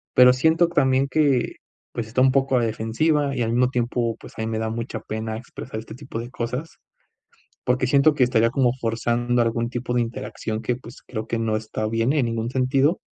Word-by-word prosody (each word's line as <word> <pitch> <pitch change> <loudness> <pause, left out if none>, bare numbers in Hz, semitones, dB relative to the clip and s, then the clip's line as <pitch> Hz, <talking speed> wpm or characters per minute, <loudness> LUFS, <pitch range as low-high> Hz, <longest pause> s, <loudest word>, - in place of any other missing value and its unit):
pero 125 0 +8
siento 160 +6 +3
también 135 -4 +2
que, 140 -5 +2 0.4
pues, 115 -2 -4
está 125 +3 0
un 130 0 +5
poco 135 0 +2
a 125 - +4
la 115 - +1
defensiva, 135 +6 0
y 125 - -1
al 115 - -1
mismo 125 +1 +3
tiempo, 120 -2 -1
pues - - -12
a - - -3
mí 110 - -1
me 110 -1 -2
da 110 - -1
mucha 115 0 -4
pena 110 0 -4
expresar 120 -1 -7
este 110 - -10
tipo 125 -2 -8
de 120 +2 -7
cosas, 125 +7 -4 0.9
porque 125 +1 +1
siento 140 +2 +4
que 130 - +3
estaría 115 -2 +3
como 125 0 +2
forzando 120 +1 0
algún 115 0 -1
tipo 120 0 -3
de 120 - +2
interacción 115 -2 -4
que, 125 - 0
pues, 120 -1 -12
creo 110 -3 -5
que 115 - -1
no 110 -1 0
está 110 0 -3
bien 115 +3 +1
en 145 -5 +2
ningún 115 0 -2
sentido. 135 +5 +2
120 Hz, 215 wpm, -23 LUFS, 115-130 Hz, 0.9 s, pero